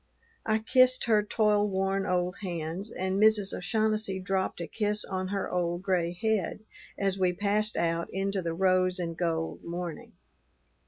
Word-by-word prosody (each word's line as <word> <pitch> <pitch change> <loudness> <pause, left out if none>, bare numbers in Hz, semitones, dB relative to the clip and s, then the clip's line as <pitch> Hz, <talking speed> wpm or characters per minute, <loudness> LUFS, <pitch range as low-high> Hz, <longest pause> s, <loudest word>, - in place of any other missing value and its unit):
I 220 0 +3
kissed 255 +3 +4
her 220 -3 +3
toilworn 205 -2 +1
old 180 0 0
hands, 175 +2 -4
and 190 +1 -2
Mrs. 215 -2 +4
O'Shaughnessy 215 0 0
dropped 190 0 -1
a 170 - -3
kiss 210 +2 0
on 185 -1 -3
her 200 +1 -2
old 175 0 -1
gray 180 -3 +1
head 205 +1 -1 0.4
as 195 -1 0
we 180 -1 +2
passed 210 +3 +1
out 170 0 0
into 195 0 -1
the 165 -1 -3
rose 185 0 +2
and 170 -2 -3
gold 165 -1 -2
morning. 170 -1 -6
190 Hz, 150 wpm, -29 LUFS, 180-210 Hz, 0.4 s, kissed